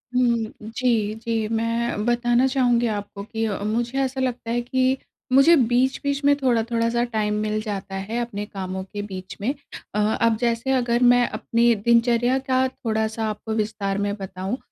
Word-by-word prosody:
हुँ। 235 -3 +2 0.3
जी, 225 -4 +1
जी, 225 -1 -2
मैं 230 0 -1
बताना 240 +1 +2
चाहूँगी 245 -3 +2
आपको 205 -1 -4
कि 225 +1 -4
अ, 200 -2 -2
मुझे 235 +4 -1
ऐसा 265 0 -2
लगता 245 -2 -2
है 240 - +1
कि 260 +2 +1 0.3
मुझे 275 +6 +7 0.2
बीच-बीच 270 +3 +1
में 285 0 +6
थोड़ा-थोड़ा 235 -3 +1
सा 235 +1 +1
टाइम 215 -3 -1
मिल 215 0 -1
जाता 200 -3 -5
है 205 +5 -4
अपने 210 -3 -4
कामों 190 -1 -5
के 205 +2 -6
बीच 185 0 -7
में। 255 +7 0 0.4
अ, - - +1
अब 220 +1 +2
जैसे 235 +2 0
अगर 245 -1 +2
मैं 245 -1 +3
अपनी 235 0 +2
दिनचर्या 235 +3 +3
का 260 0 +3
थोड़ा-सा 220 -3 -2
आपको 220 +1 -4
विस्तार 210 -2 -1
में 205 - -1
बताऊँ, 190 +4 -4
230 Hz, 165 wpm, -23 LUFS, 215-245 Hz, 0.4 s, मुझे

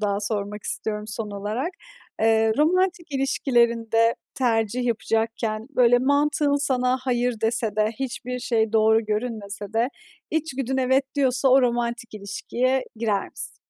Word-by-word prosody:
daha 205 -1 0
sormak 210 0 -3
istiyorum, 210 -1 -3
son 215 0 -4
olarak. 210 - -3 0.5
Eee, 220 0 +4
romantik 345 0 +1
ilişkilerinde 235 -4 +2 0.2
tercih 240 -1 0
yapacakken, 225 -1 -1
böyle, 245 -2 +4
mantığın 285 +2 +2
sana 255 -2 +1
"hayır" 245 -3 -1
dese 225 -2 -1
de 215 0 +2
hiçbir 250 -1 -4
şey 225 -3 0
doğru 220 0 +4
görünmese 210 -2 -4
de 230 +2 +2 0.4
içgüdün 270 -5 -2
"evet" 260 +1 +2
diyorsa 265 -2 +2
o 260 +1 +6
romantik 235 -1 -1
ilişkiye 240 +6 -1
girer 215 -3 -1
misin? - - -7
235 Hz, 125 wpm, -24 LUFS, 220-260 Hz, 0.5 s, o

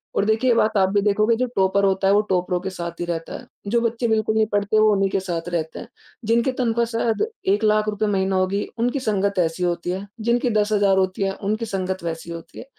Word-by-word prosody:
और 200 - +2
देखिए, 220 +4 +2
ये 235 - +4
बात 215 -1 +2
आप 190 -1 +3
भी 205 0 +2
देखोगे 215 +3 +2
जो 255 0 0
टॉपर 195 +1 +2
होता 195 0 +1
है 195 - +5
वो 210 - +5
टॉपरों 180 -1 0
के 190 - -4
साथ 170 -2 -6
ही - - -1
रहता 165 -1 -4
है, - - -13 0.2
जो 235 +3 +2
बच्चे 230 +1 -1
बिल्कुल 220 0 +1
नहीं 220 0 +3
पढ़ते 205 +1 +2
वो 215 0 +5
उन्हीं 195 -1 +1
के 195 - 0
साथ 175 -2 -4
रहते 160 -2 -3
हैं। - - -9 0.4
जिनके 235 +3 +2
तनख्वाह 235 -1 +1
शायद 230 - 0 0.3
₹1,00,000 215 0 +2
रूपये 210 0 -1
महीना 190 -1 0
होगी, 185 +2 0 0.2
उनकी 245 +4 0
संगत 200 -4 0
ऐसी 165 +1 0
होती 175 0 -1
है, 195 +2 -5
जिनकी 240 +2 +1
10,000 205 -2 +2
होती 190 +1 0
है 195 0 0
उनकी 215 +3 -1
संगत 190 -3 -3
वैसी 165 0 -5
होती 165 -1 -9
है। - - -9
200 Hz, 235 wpm, -22 LUFS, 185-220 Hz, 0.4 s, है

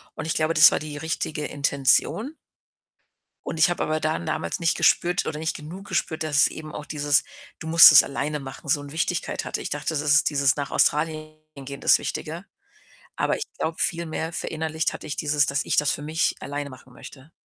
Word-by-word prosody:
und 160 - -6
ich 160 - -1
glaube, 155 +1 0
das 155 +1 +8
war - - -1
die 150 -1 -7
richtige 155 -1 -3
Intention. 145 - +1 1.1
Und - - -5
ich 160 - +4
habe 175 - -2
aber 155 0 -1
dann 155 +2 -2
damals - - -3
nicht 165 -1 +1
gespürt 175 +1 +2
oder 150 - -4
nicht 160 0 -3
genug 175 +7 -10
gespürt, 165 -4 -2
dass 155 -2 -2
es - - +7
eben 155 -1 -10
auch - - -7
dieses: 145 -1 +1 0.3
„Du - - -9
musst 165 +1 +9
es 140 - +9
alleine 150 +2 -4
machen” 135 +1 -10
so 145 +1 +1
'ne 145 0 -10
Wichtigkeit 170 +1 -2
hatte. - - -4
Ich - - -5
dachte, 145 0 -4
das 160 -3 0
ist 145 0 +3
dieses 140 -2 +2
„nach 140 -1 -4
Australien 155 0 0 0.3
gehen” 140 +1 -8
das - - +5
Wichtige, - - -6 0.7
aber - - 0
ich - - -4
glaube, 160 0 -3
viel 170 0 0
mehr 160 +1 -4
verinnerlicht 160 -1 -3
hatte - - -9
ich 145 - -5
dieses 150 -1 +1
dass 140 +1 -1
ich - - -1
das 150 - +3
für - - -3
mich 155 +2 -1
alleine 145 +1 -5
machen 130 0 -15
möchte. 135 +3 -14
155 Hz, 210 wpm, -24 LUFS, 145-160 Hz, 1.1 s, musst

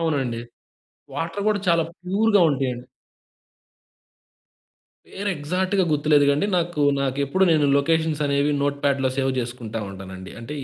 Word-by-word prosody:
అవునండి. 135 -8 -1 0.7
వాటర్ 165 +5 -3
గూడా 205 -2 +1
చాలా 170 -1 +4 0.2
ప్యూర్‌గా 205 +3 +3
ఉంటయండి. 130 -3 -2 2.2
పేరు 200 +1 -4
ఎగ్జాక్ట్‌గా 185 +6 0
గుర్తులేదుగాండి. 145 +3 +3
నాకు 170 -3 -1 0.2
నాకు 135 -1 -1
ఎప్పుడు 190 +8 +1
నేను 155 -2 +3
లొకేషన్స్ 160 +1 +1
అనేవి 140 +1 +1
నోట్‌ప్యాడ్‌లో 140 -2 0
సేవ్ 135 -1 +1
జేసుకుంటా 115 -2 -5
ఉంటానండి. 95 -1 -9
అంటే 125 +6 -7
145 Hz, 115 wpm, -23 LUFS, 130-170 Hz, 2.2 s, చాలా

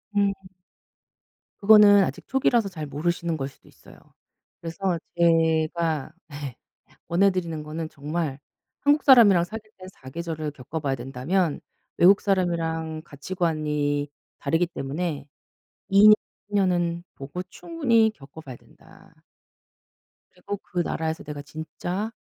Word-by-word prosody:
음. 200 -1 +3 1.3
그거는 205 -1 +7
아직 - - -5
초기라서 240 -5 +2
잘 155 -5 -6
모르시는 165 +3 -2
걸 135 -2 -3
수도 140 - -18
있어요. - - -18 0.6
그래서 170 +2 -2 0.2
제가 160 -2 +2 0.2
네 145 -4 -7 0.5
권해 180 +4 +4
드리는 165 -4 -3
거는 155 +1 -5
정말 150 -1 -4 0.4
한국 290 +1 +3
사람이랑 220 -10 +7
사귈 215 +3 -8
때 185 - -11 0.2
사계절을 155 +2 -5
겪어봐야 140 0 -4
된다면 140 +7 -1 0.4
외국 195 +3 +6
사람이랑 165 -4 -1
가치관이 150 -2 -2 0.3
다르기 165 +5 +1
때문에 145 -1 -4 0.6
2 200 +2 +7
년, 215 - +10 0.4
3 205 - -4
년은 175 -3 +1
보고 140 +6 -6
충분히 230 - +1
겪어봐야 140 -1 -11
된다. - - -20 1.2
그리고 200 +3 -6
그 180 -2 -6
나라에서 160 -1 -2
내가 145 -1 -7
진짜 165 +8 -5
165 Hz, 265 characters per minute, -25 LUFS, 150-195 Hz, 1.3 s, 년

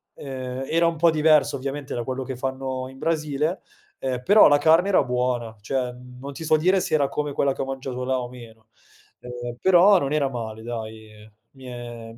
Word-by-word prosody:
ehm, 130 -1 -6
era 165 +1 +2
un 170 - 0
po' 165 +1 +4
diverso 155 -2 +3
ovviamente 140 +1 -5
da 120 - -2
quello 130 +2 -4
che 130 0 -6
fanno 130 0 -4
in 130 - -14
Brasile, 155 +2 -1 0.4
ehm, 125 -2 -3
però 210 +7 +7
la 145 - +5
carne 160 +5 +4
era 190 - +4
buona. 125 -2 -2
Cioè 125 +4 -2
non 125 +2 -10
ti 165 - -8
so 155 - +4
dire 185 +5 +3
se - - -3
era 140 -3 +2
come 150 -1 -3
quella 140 0 +1
che - - -5
ho - - -1
mangiato 135 -1 -5
là 130 0 0
o 125 -1 -5
meno, 115 -3 -14 0.5
ehm, 120 -1 -7
però 190 +1 +6
non 140 -1 -2
era 145 -3 +1
male, 110 -3 -6
dai, 110 -2 -8 0.2
mi 135 -1 -15
è 120 -2 -8
mi - - -16
130 Hz, 205 wpm, -24 LUFS, 125-150 Hz, 0.5 s, però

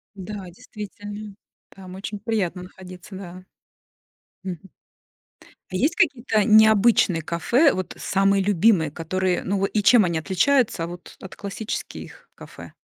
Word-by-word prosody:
Да, 200 0 -7
действительно. 205 +2 -9 0.3
Там 185 -1 -12
очень 205 +1 -6
приятно 200 -5 -2
находиться, 185 +1 -12
да. 185 -1 -10 1.0
Мгм. 180 -3 -5 1.1
А - - -4
есть 290 - +1
какие-то 240 -9 +1
необычные 215 -5 +5
кафе? 235 - +2
Вот 185 -1 -5
самые 195 0 +1
любимые, 195 -5 +3
которые, 180 +3 -2
ну, 200 +1 0
во 195 - +1
и 210 +1 -1
чем 220 +1 +6
они 170 -2 -1
отличаются, 205 - +1
вот, 175 +1 -10
от 190 - -10
классических 205 +2 -7
кафе? - - -12
195 Hz, 125 wpm, -23 LUFS, 180-215 Hz, 1.1 s, чем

